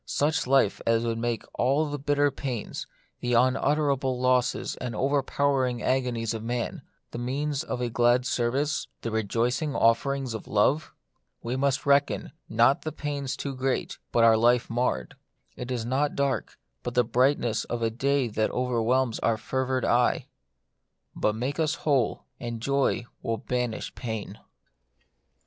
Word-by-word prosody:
Such 145 -2 0
life 130 -6 +3
as 115 0 +3
would 115 -1 -1
make 120 -1 -1
all 140 +5 +2
the 145 0 -4
bitter 145 0 +2
pains, 125 -7 -5 0.3
the 120 0 -1
unutterable 135 +1 +2
losses 125 -1 +1
and 125 -3 -4
overpowering 135 -1 +1
agonies 125 -3 0
of 110 - -4
man, 120 +1 -3 0.3
the - - -5
means 140 +3 -2
of 125 - -4
a 120 - 0
glad 120 +2 +3
service, 130 +4 0
the 115 - -3
rejoicing 115 +7 0
offerings 130 +2 +2
of 110 - -6
love? 130 +9 +2 0.5
We 120 +2 -2
must 135 +2 0
reckon, 140 0 +2 0.2
not 120 +5 +4
the 155 - -4
pains 140 -3 -4
too 140 -1 -4
great, 130 0 -2
but 115 - +3
our 115 -1 +6
life 120 +1 +3
marred. 115 - -1 0.4
It 125 - -6
is 120 -3 -2
not 135 +4 0
dark, 140 -1 -1 0.2
but 120 - -5
the 125 - +5
brightness 120 -1 +1
of 120 -1 -3
a 115 - +1
day 135 +2 +1
that 110 -1 0
overwhelms 125 0 +1
our 115 -1 +1
fevered 130 +2 -1
eye. 120 +1 +2 0.9
But 105 - +1
make 130 +7 -3
us 160 -1 +1
who 155 - -2
ley - - -6 0.2
and 120 -1 -4
joy 140 -1 +1 0.2
will 115 0 -1
banish 125 0 -3
pain. 110 -4 -5
125 Hz, 155 wpm, -27 LUFS, 115-140 Hz, 0.9 s, our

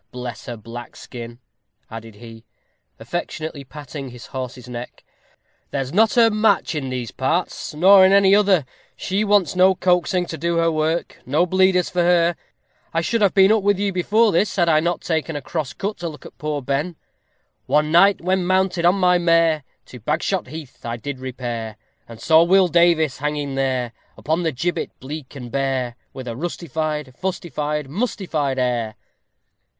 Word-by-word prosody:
Bless 125 -1 -7
her 120 -2 -5
black 115 +3 -9
skin," 120 -1 -9 0.5
added 115 -1 -9
he, 115 0 -12 0.6
affectionately 155 -3 -5
patting 140 -1 -8
his 125 -1 -11
horse's 130 -2 -7
neck, 120 0 -8 0.7
"there's 135 0 -3
not 220 +4 +3
her 230 -2 +5
match 215 -4 +2
in 140 -4 -3
these 125 -3 -4
parts, 155 +3 -2
or 190 +4 +7
in 190 - +6
any 195 0 +5
other; 200 -7 +4 0.3
she 195 +3 -1
wants 205 -3 +2
no 185 +1 +5
coaxing 180 0 +1
to 160 -2 -7
do 170 +2 0
her 165 0 +2
work 160 +2 -1
no 150 +7 +1
bleeders 185 0 +2
for 180 - +1
her. 170 -1 +3 0.6
I 165 - 0
should 230 +7 -1
have 200 -1 +3
been 195 +1 +6
up 220 -1 +3
with 200 0 +2
you 200 0 -1
before 210 +5 +3
this 185 +4 +1
had 175 -3 +2
I 155 -2 +4
not 170 +2 -1
taken 160 -1 -2
a - - -2
cross 155 -4 -4
cut 205 +2 -4
to 170 - -3
look 150 - -12
at - - -13
poor 150 -2 -3
Ben. 145 +6 -2 0.7
One 150 +3 +2
night, 195 +4 +5
when 185 +1 +1
mounted 185 -2 +1
on 175 +2 +5
my 180 -2 +3
mare. 165 -3 +3 0.2
To 125 - -12
Bagshot 155 - -1
Heath 150 -1 -10
I 115 0 -4
did 130 +3 -6
repair, 120 -4 -5 0.3
And 115 -1 -11
saw 160 +6 +5
Will 185 +1 +4
Davies 165 -4 +3
hanging 145 -1 -2
there, 130 -3 -1 0.3
Upon 160 +3 -1
the 165 -2 0
gibbet 170 +7 -3
bleak 145 +1 -8
and 125 -3 -8
bare, 130 -3 -1 0.2
_With 130 - -7
a 120 - -4
rustified, 155 -2 -4
fustified, 150 -5 -3
mustified 160 - -2
air. 120 -4 -1
160 Hz, 175 wpm, -21 LUFS, 130-180 Hz, 0.7 s, or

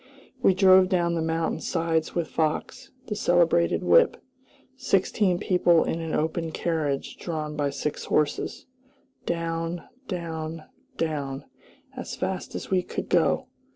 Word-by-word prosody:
We 190 - +4
drove 185 -1 +6
down 170 -2 +1
the 165 - 0
mountain 160 0 -1
sides 165 -1 -1
with 170 -2 0
Fox, 155 0 -2 0.2
the 210 - -3
celebrated 170 -3 +3
whip; - - +5 0.6
sixteen 195 -6 +1
people 175 -3 +3
in 165 - -2
an 160 -1 -2
open 160 +1 -1
carriage 155 -5 -2
drawn 155 -3 -4
by 145 -1 0
six 140 +2 -4
horses, 150 -1 -1 0.6
down, 165 0 -2 0.2
down, 165 -3 -4 0.3
down, 145 -4 -2 0.5
as - - -6
fast - - -4
as - - -6
we 185 -1 +3
could - - -5
go. - - +2
165 Hz, 130 wpm, -26 LUFS, 155-175 Hz, 0.6 s, drove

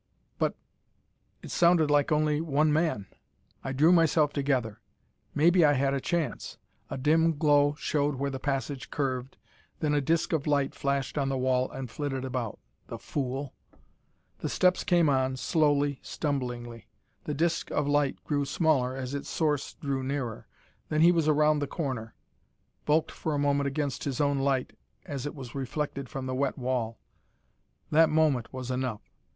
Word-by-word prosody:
But - - +1 0.9
it - - -8
sounded 170 -3 +4
like 145 0 +3
only 150 0 +2
one 155 -1 +2
man. 155 - 0 0.6
I 135 - -3
drew 150 +6 +4
myself 160 -3 +3
together. 130 -7 -1 0.5
Maybe 170 +4 +5
I 145 -1 +5
had 135 0 +1
a 135 - -1
chance. 165 -6 -2 0.3
A - - -4
dim 160 +3 +3
glow 145 -1 +4
showed 145 -2 0
where 140 +1 -2
the 135 - -5
passage 135 0 -3
curved, 130 -2 -3 0.4
then 150 -2 0
a 145 - +2
disk 160 +4 0
of 155 -2 0
light 140 -2 +1
flashed 140 +1 -1
on 135 -1 0
the 135 - -1
wall 130 0 +1
and 135 -1 -6
flitted 135 -2 -3
about. 125 -4 -3 0.3
The - - -6
fool! 135 0 -4 0.9
The - - -3
steps 180 0 +2
came 175 -2 +3
on, 130 -2 +1
slowly, 145 -1 +1
stumblingly. 120 -6 -4 0.4
The 150 - -2
disk 170 +3 0
of 145 - 0
light 145 -1 +1
grew 145 -2 0
smaller 140 -4 +1
as 130 0 -5
its 140 - -4
source 150 -4 -1
drew 140 -2 -2
nearer. 130 -4 -4 0.4
Then 155 0 +1
he 170 +2 +7
was 165 -3 +1
around 150 0 +4
the 145 - -2
corner, 130 -8 -4 0.7
bulked 155 +2 +2
for 155 -2 -3
a - - 0
moment 140 0 +1
against 140 -1 -2
his 135 -4 -2
own 140 -1 +2
light 135 -1 0 0.3
as 140 -1 -4
it 145 - -6
was 130 -4 -9
reflected 140 0 -4
from 135 -3 -5
the 130 - -3
wet 135 +1 -1
wall. 125 -4 -2 0.9
That 160 +1 +5
moment 150 -7 +2
was 130 -1 -5
enough! 125 -4 -2
140 Hz, 165 wpm, -28 LUFS, 130-150 Hz, 0.9 s, he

